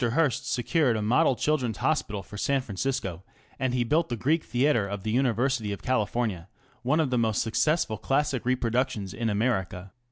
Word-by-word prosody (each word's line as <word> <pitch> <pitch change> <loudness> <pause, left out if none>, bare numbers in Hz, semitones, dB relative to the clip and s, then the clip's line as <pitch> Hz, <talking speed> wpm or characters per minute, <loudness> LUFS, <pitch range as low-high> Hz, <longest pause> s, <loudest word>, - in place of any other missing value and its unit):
Hearst 135 -5 +1
secured 125 0 +1
a - - -2
model 120 +4 +3
Children's 130 -6 0
Hospital 105 -10 -1
for 105 - -12
San 135 +6 +1
Francisco, 100 -5 -3 0.4
and 130 -1 0
he 125 -1 +1
built 160 +8 +1
the 120 - -1
Greek 150 +8 +1
Theatre 120 -4 +1
of 100 -1 -5
the 110 - -2
University 125 -2 +1
of 100 - -6
California 110 -6 -1
ŌĆö - - -34
one 135 +6 +1
of 150 -5 +1
the 125 - +2
most 110 -2 +1
successful 115 -1 0
classic 135 +2 0
reproductions 120 -4 -1
in 115 +2 -2
America. 100 -4 -1
120 Hz, 180 wpm, -27 LUFS, 105-135 Hz, 0.4 s, model